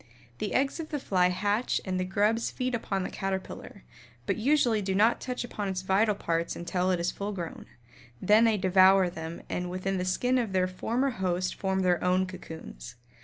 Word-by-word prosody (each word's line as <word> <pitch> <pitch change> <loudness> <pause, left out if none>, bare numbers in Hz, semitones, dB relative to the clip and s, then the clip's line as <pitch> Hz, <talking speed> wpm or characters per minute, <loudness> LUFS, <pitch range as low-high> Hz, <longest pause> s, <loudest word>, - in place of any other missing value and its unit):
The 210 - -2
eggs 275 +4 +1
of 315 -1 -5
the 295 - -2
fly 185 -9 +2
hatch 205 +6 0
and 185 -1 -1
the - - 0
grubs 210 +5 +1
feed 255 -1 -3
upon 195 -5 -2
the - - -4
Caterpillar, 195 +1 -5 0.4
but - - 0
usually 240 -3 +2
do 190 -1 -1
not 220 +4 +3
touch 250 -1 -3
upon 210 -4 -4
its 190 -1 -3
vital 200 +3 +2
parts 170 -3 -2
until 180 +1 -1
it 180 -2 +1
is 175 +1 0
full 200 +1 -4
grown, 170 -4 -6 0.5
then 210 +4 +5
they 225 -2 +3
devour 185 -1 +5
them 160 0 -7
and 180 0 -3
within 185 +1 -2
the - - -1
skin 250 +7 +1
of 225 -5 -2
their 185 -1 +3
former 235 +9 -1
host 185 -3 -1
form 190 -1 -1
their 180 -2 +2
own 185 +1 +2
cocoons. 160 - -9
190 Hz, 195 wpm, -28 LUFS, 185-220 Hz, 0.5 s, then